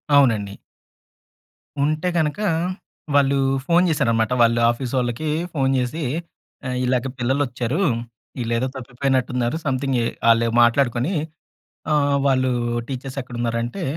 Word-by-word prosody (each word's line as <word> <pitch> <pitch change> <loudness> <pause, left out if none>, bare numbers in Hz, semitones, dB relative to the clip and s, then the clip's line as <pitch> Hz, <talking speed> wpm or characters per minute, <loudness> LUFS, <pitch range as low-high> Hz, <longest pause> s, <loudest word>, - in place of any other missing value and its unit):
అవునండి. 110 -8 +3 1.3
ఉంటే 155 +4 0
గనుక, 150 0 0 0.8
వాళ్ళు 140 -1 +4 0.3
ఫోను 175 +3 +4
జేసారన్నమాట. 115 -7 +1
వాళ్ళ 115 0 +4
ఆఫీ‌సొళ్ళకి 125 +3 -2 0.2
ఫోను 135 -3 +1
జేసి, 125 +6 -2 0.6
"ఆహ్, 125 0 -2
ఇలాగ 125 +1 0
పిల్లలోచ్చారు. 130 - -1 0.6
వీళ్ళేదో 120 +1 -1
తప్పిపోయినట్టున్నారు. 125 0 -1
సమ్‌థింగ్ 135 -1 0
ఏ" - - 0 0.3
ఆళ్ళే 115 0 +3
మాట్లాడుకొని 120 +5 +2 0.8
ఆహ్, 145 -1 +2
వాళ్ళు 130 -1 +2 0.4
టీచర్స్ 135 0 -6
ఎక్కడ 125 -1 -10
ఉన్నారు 115 -1 0
అంటే, 150 +11 -5
130 Hz, 105 wpm, -22 LUFS, 120-140 Hz, 1.3 s, వాళ్ళు